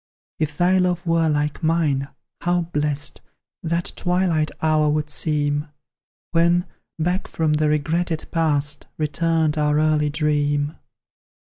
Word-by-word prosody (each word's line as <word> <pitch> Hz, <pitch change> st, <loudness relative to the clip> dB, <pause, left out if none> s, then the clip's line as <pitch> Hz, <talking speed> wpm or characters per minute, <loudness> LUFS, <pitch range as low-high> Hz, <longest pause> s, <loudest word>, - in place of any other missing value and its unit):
If 150 Hz, -2 st, -2 dB
thy 185 Hz, +2 st, +3 dB
love 180 Hz, 0 st, 0 dB
were 165 Hz, -1 st, +2 dB
like 150 Hz, +1 st, -1 dB
mine, 155 Hz, -4 st, +1 dB, 0.3 s
how 175 Hz, 0 st, +1 dB
blest 150 Hz, -3 st, -1 dB, 0.4 s
That 170 Hz, +1 st, -1 dB
twilight 175 Hz, -4 st, +1 dB
hour 155 Hz, -1 st, +2 dB
would 150 Hz, 0 st, -1 dB
seem, 145 Hz, 0 st, -1 dB, 0.6 s
When, 170 Hz, +1 st, +3 dB, 0.3 s
back 180 Hz, +4 st, -1 dB
from 160 Hz, -2 st, 0 dB
the 150 Hz, 0 st, +2 dB
regretted 160 Hz, +2 st, -1 dB
Past, 150 Hz, -3 st, 0 dB
Returned 155 Hz, 0 st, +1 dB
our 150 Hz, 0 st, +2 dB
early 155 Hz, -1 st, +2 dB
dream! 145 Hz, -1 st, 0 dB
155 Hz, 120 wpm, -22 LUFS, 150-170 Hz, 0.6 s, thy